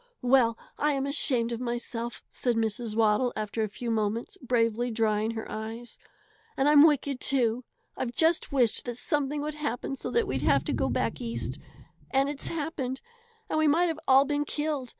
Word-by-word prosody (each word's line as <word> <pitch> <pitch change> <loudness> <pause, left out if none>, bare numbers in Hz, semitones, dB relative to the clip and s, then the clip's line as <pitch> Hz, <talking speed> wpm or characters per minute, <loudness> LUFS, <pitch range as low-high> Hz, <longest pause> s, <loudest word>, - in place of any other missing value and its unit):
"Well, 245 -3 +4 0.2
I 300 0 +2
am 275 -1 -1
ashamed 255 -4 +1
of 230 - -3
myself!" 240 -1 -4
said 245 -2 -1
Mrs. 225 0 -2
Waddle, 225 +2 +3
after 215 +1 -3
a 215 - 0
few 235 +3 -4
moments, 220 +1 -1
bravely 240 -1 +1
drying 220 -1 +1
her 220 - -4
eyes. 225 +2 -7 0.6
"And 270 - +2
I'm 295 +1 +8
wicked, 280 -3 0
too! 245 -3 +1 0.3
I've 250 -2 -3
just 320 +5 +2
wished 250 -5 +1
that 240 -1 -3
something 290 +2 -1
would 305 +1 -3
happen 290 -3 -3
so - - -5 0.2
we'd - - -2
have - - +3
to - - -2
go - - 0
back - - -1
East, 230 -1 -4 0.5
and 270 +1 +2
it's 285 -1 -4
happened; 290 -5 -3 0.5
and 310 - 0
we 310 - +3
might 335 +4 +3
have 320 -1 -3
all 270 +1 +6
been 290 +1 0
killed. 295 -3 -3
250 Hz, 180 wpm, -28 LUFS, 230-285 Hz, 0.6 s, I'm